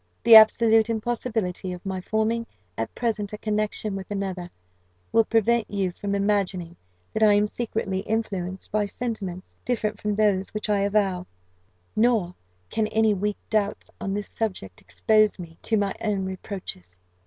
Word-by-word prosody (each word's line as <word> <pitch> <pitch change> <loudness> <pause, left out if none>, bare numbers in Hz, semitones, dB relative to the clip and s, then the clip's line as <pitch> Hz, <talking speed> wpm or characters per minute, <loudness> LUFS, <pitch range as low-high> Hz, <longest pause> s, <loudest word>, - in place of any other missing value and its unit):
"The 230 - +7
absolute 220 0 +7
impossibility 220 -5 -2
of 180 +1 -10
my 190 -1 -3
forming 225 +3 0 0.3
at 115 0 -4
present 215 -4 -2
a - - -4
connexion 215 -1 -1
with 195 -1 -6
another, 190 -3 -3 0.6
will 225 - +4
prevent 230 +1 +2
you 195 -3 -1
from 200 +2 -3
imagining 195 -4 0 0.4
that 220 - -2
I 215 -1 +7
am 205 0 +4
secretly 210 -3 -2
influenced 195 -3 -3
by 210 0 +1
sentiments 200 -6 -4
different 215 -3 -2
from 210 -1 0
those 205 -2 +1
which 215 0 -3
I 205 - +3
avow; 195 -3 +1 0.7
nor 215 -6 +2 0.4
can 220 -1 +1
any 220 0 +3
weak 205 +1 -1
doubts 210 -2 -1
on 195 0 -2
this 205 -1 -3
subject 185 - -4
expose 210 - +2
me 165 -3 -10
to 220 - +1
my 200 -1 0
own 205 -3 0
reproaches. 185 - -7
205 Hz, 155 wpm, -25 LUFS, 190-220 Hz, 0.7 s, The